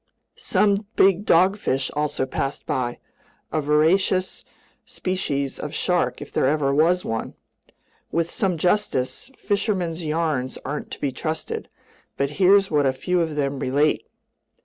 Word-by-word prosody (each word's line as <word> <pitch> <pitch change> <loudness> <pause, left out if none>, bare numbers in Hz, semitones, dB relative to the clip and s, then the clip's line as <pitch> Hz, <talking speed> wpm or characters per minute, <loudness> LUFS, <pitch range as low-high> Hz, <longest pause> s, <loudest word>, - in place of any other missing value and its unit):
Some 205 0 +1
big 195 +1 +4
dogfish 175 -6 +2
also 150 -3 -1
passed 135 +1 -3
by, 120 -2 -2 0.5
a 155 - 0
voracious 165 +6 +2 0.4
species 140 -8 -3
of 150 - -5
shark 175 -9 0
if - - -14
there - - +2
ever 140 -1 +1
was 170 +5 +3
one. 115 0 -3 0.8
With 165 +1 +1
some 190 -4 0
justice, 180 - 0
fishermen's 190 -5 -1
yarns 150 -5 -1
aren't 145 +3 -4
to - - -8
be 140 - -1
trusted, 155 +4 -4 0.5
but 140 0 0
here's 195 +1 +5
what 145 -2 +3
a 130 - +2
few 175 +7 0
of 160 -2 -2
them 140 -2 -1
relate. 145 +4 +1
155 Hz, 135 wpm, -23 LUFS, 140-185 Hz, 0.8 s, here's